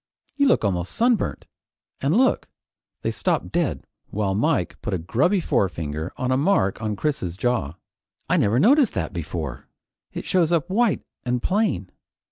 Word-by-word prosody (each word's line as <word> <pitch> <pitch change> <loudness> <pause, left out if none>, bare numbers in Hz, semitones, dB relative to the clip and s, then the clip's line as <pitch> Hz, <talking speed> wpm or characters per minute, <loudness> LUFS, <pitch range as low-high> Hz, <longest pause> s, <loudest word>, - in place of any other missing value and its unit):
You 280 -1 +3
look 240 - +3
almost 90 -3 -1
sunburnt. 235 -2 +1 0.6
And 145 +9 +2
look 260 +1 +2 0.3
" - - -62
They - - 0
stopped - - -1
dead 170 -4 -1 0.2
while 100 -2 -1
Mike 100 - 0
put - - -2
a - - 0
grubby 135 - +1
forefinger 80 - -1
on 130 0 -1
a 130 - +3
mark 140 - +2
on 105 -1 -1
Chris's 100 - -2
jaw. 110 - -1 0.5
"I - - +2
never 105 +3 +2
noticed 255 - +4
that 85 0 -2
before. 80 -6 -5 0.4
It - - -6
shows 175 -3 +2
up 170 +1 +1
white 230 +1 +2 0.2
an' 125 0 0
plain. 180 - 0
125 Hz, 160 wpm, -23 LUFS, -, 0.6 s, noticed